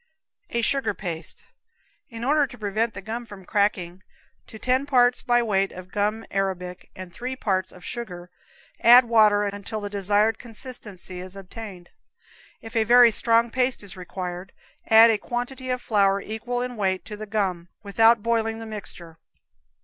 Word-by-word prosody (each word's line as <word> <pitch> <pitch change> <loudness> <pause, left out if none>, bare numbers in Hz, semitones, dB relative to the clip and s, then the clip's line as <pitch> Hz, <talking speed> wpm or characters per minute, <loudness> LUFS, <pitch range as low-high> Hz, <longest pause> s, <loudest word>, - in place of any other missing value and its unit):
A 235 - -1
Sugar 230 -4 +1
Paste. 165 -4 -4 0.6
In 230 -2 -8
order 290 +2 +3
to 245 - -12
prevent 215 +1 -1
the 195 - -7
gum 230 +4 -5
from 205 -5 -12
cracking, 190 -4 0 0.5
to 220 - -11
ten 255 +4 0
parts 245 -3 +3
by 240 -1 +2
weight 195 -3 +1
of 185 0 -11
gum 210 +2 -1
arabic 185 -2 -3
and 185 -2 -9
three 250 +2 -5
parts 190 -6 -1
of 180 -1 -14
sugar 180 -7 -7 0.5
add 245 +2 +8
water 215 -3 +4
until 205 +2 -4
the 205 -1 -6
desired 205 +2 +1
consistency 215 -6 -10
is 185 +1 -9
obtained. 195 -2 -10 0.7
If 225 +1 -11
a 225 - +3
very 240 +1 +7
strong 230 +1 +2
paste 255 -2 +1
is 200 - -4
required, 180 0 -7 0.3
add 225 +1 +8
a 215 - 0
quantity 245 +3 -5
of 250 -1 -2
flour 200 -2 +2
equal 240 +4 -4
in 250 -1 -6
weight 190 -3 -1
to 210 - -7
the 215 +1 -8
gum, 190 -5 -2
without 225 +2 +4
boiling 225 -1 0
the 225 - -8
mixture. 175 -6 -7
215 Hz, 165 wpm, -24 LUFS, 190-235 Hz, 0.7 s, add